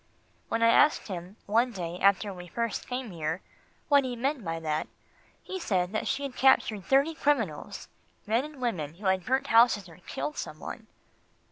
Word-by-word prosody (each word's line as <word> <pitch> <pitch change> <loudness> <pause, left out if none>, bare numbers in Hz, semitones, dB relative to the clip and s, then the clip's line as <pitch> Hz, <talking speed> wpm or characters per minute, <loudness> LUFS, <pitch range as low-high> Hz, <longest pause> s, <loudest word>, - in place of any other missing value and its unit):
When 230 0 0
I 230 - +6
asked 295 +1 +4
him, 180 +1 -6
one 230 +4 +2
day 175 -2 -5
after 200 +1 +3
we 180 -1 -9
first 230 +4 -3
came 250 -3 -4
here, 160 +1 -3 0.4
what 285 -2 +5
he 255 -1 -3
meant 265 +1 -1
by 165 -2 -3
that, 155 -1 -2 0.6
he 375 - -5
said 185 - 0
that 215 - -2
she 275 +1 -1
had 275 -2 -5
captured 225 -7 +3
thirty 275 +4 +3
criminals 240 - -1 0.4
men 225 +4 +2
and 300 -2 -10
women 165 - -2
who 200 +4 -11
had 190 -1 +1
burnt 265 +2 +1
houses 230 -6 +4
or 165 - -14
killed 300 - -4
some - - -5
one. - - -8
225 Hz, 180 wpm, -28 LUFS, 180-265 Hz, 0.6 s, I